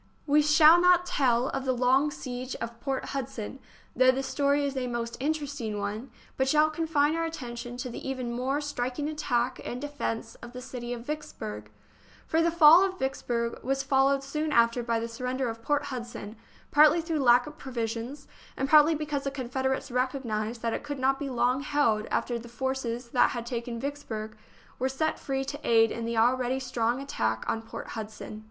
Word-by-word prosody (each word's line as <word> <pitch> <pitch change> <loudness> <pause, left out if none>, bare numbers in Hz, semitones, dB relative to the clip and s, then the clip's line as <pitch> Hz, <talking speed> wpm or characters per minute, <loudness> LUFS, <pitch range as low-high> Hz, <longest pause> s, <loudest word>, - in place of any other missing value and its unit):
We 295 +1 +4
shall 305 +3 +7
not 360 0 +5
tell 255 -7 +2
of 270 - -3
the 260 -1 +1
long 260 +4 +3
siege 255 -2 -6
of 230 0 -6
Port 270 +1 -3
Hud 275 -3 -2
son, 225 +4 -7 0.4
though 255 +1 +5
the 260 +1 +2
story 285 +1 +1
is 275 -1 -3
a 255 -1 -2
most 235 -1 -3
interesting 280 -7 -2
one, 210 +5 -4 0.3
but 265 - +1
shall 305 +2 +4
confine 310 -1 +1
our 330 - 0
attention 245 -6 -6
to 250 0 -4
the 265 - -6
even 255 -3 -3
more 260 +4 -1
striking 285 0 -3
attack 255 -5 -1
and 245 - -5
defence 255 -5 -4
of 240 0 -10
the 250 - -6
city 245 -1 -6
of 240 -1 -5
Vicks 300 +2 -5
burg; 105 0 -6 0.6
for 325 - +1
the 335 - +3
fall 335 +1 +8
of 380 -1 -1
Vicksburg 240 -4 -2
was 270 +2 0
followed 270 0 +3
soon 300 +3 -2
after 235 -2 +3
by 230 -1 0
the 230 - -3
surrender 250 +2 -2
of 225 0 -7
Port 290 +4 0
Hudson, 235 -3 -6 0.4
partly 305 +3 +6
through 325 -2 -2
lack 245 -2 +5
of 300 +1 -11
provisions, 240 +2 -4 0.3
and 270 - 0
partly 305 +2 +6
because 295 -2 -3
the - - +1
Confederates 265 0 -2
recognised 240 -3 -2
that 230 -1 0
it - - -2
could 290 -1 -5
not 270 +1 +1
be 285 - -3
long 250 +1 +1
held 280 -8 +1
after 240 -1 -1
the 235 +1 -11
forces 245 -1 -3
that 245 - +4
had 240 -2 -4
taken 235 -1 -4
Vicksburg 225 -6 -5 0.4
were 260 +1 +1
set 315 +4 -1
free 270 -1 -2
to 290 +2 -5
aid 225 -1 +4
in 230 0 -4
the 230 0 -2
already 250 +2 +2
strong 245 -1 -1
attack 110 - -2
on 225 - -1
Port 225 - -8
Hudson. 215 -1 -7
260 Hz, 195 wpm, -28 LUFS, 235-285 Hz, 0.6 s, fall